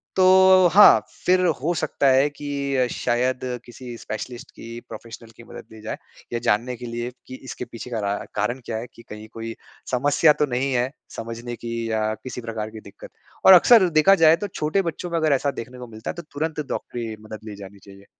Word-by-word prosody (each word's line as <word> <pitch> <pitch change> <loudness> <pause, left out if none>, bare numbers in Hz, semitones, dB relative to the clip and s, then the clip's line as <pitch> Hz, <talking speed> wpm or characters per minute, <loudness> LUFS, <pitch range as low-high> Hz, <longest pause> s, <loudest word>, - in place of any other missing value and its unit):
तो 185 0 +6
हाँ, 205 +1 +9 0.3
फ़िर 185 0 +4 0.2
हो 170 +4 0
सकता 145 -2 0
है 135 +3 +4
कि 140 -3 -2
शायद 125 +2 0 0.3
किसी 120 0 -9
स्पेशलिस्ट 120 +2 -7
की, 115 +1 -9
प्रोफ़ेशनल 115 +1 -10
की 120 - -14
मदद - - -11
ली 110 - -12
जाए, 110 +1 -5 0.4
ये 120 - 0
जानने 120 +5 +1
के 120 - -8
लिए 120 +1 -4 0.2
कि 130 - -8
इसके 130 -1 -6
पीछे 120 +1 -9
का 115 -3 -3
रा 100 - 0 0.2
कारण 105 +5 -1
क्या 110 - -3
है 120 +2 -6
कि 115 - -15
कहीं 105 +1 -9
कोई 115 0 -6 0.4
समस्या 145 +4 +4
तो - - +5
नहीं 135 +2 0
है 125 +1 0 0.3
समझने 115 +1 -6
की 115 0 -6 0.2
या 110 0 0
किसी 130 -1 -6
प्रकार 110 -2 -5
की 110 - -9
दिक्कत - - -13 0.4
और 190 - +10
अक्सर 190 +1 +7
देखा 195 +5 +6
जाए 160 +1 +7
तो - - -3
छोटे 180 0 -1
बच्चों 175 +3 -7
में 170 - 0
अगर 155 -2 +2
ऐसा 140 +1 +1
देखने 125 +2 -11
को 125 - -8
मिलता 110 0 -8
है - - -13
तो 170 - -6
तुरंत 155 +1 -3
डॉक्टरी 115 -2 -4
मदद 110 0 -8
ली 105 - -8
जानी 100 0 -11
चाहिए। 100 0 -16
125 Hz, 210 wpm, -23 LUFS, 115-145 Hz, 0.4 s, और